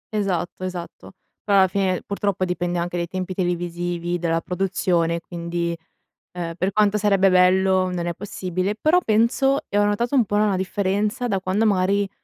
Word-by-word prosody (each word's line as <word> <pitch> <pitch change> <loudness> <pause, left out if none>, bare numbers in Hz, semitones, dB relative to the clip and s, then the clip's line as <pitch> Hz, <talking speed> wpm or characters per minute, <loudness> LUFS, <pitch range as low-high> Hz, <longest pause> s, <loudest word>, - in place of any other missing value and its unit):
Esatto, 185 -3 -2
esatto, 180 -1 -7 0.3
però 200 -1 +3
alla 190 -1 +6
fine 185 -1 -1
purtroppo 200 -2 -1
dipende 175 -1 -2
anche 175 +1 -2
dai 170 - -2
tempi 185 +1 -4
televisivi 175 -1 -2
della 165 -1 0
produzione, 180 -3 0
quindi, 170 0 -3 0.6
ehm, 170 -2 -5
per 185 +2 0
quanto 210 0 +2
sarebbe 195 -2 +3
bello 185 0 +3
non 175 -1 -3
è 170 - -1
possibile, 185 0 -3
però 310 +11 +3
penso 235 +5 +2
e 205 - -1
ho 205 - +4
notato 235 +6 0
un 250 -4 +4
po' 205 - -7
una 210 -2 +2
differenza 200 +5 -1
da 195 -4 0
quando 195 +4 +1
magari, 200 0 +1
185 Hz, 165 wpm, -22 LUFS, 175-205 Hz, 0.6 s, alla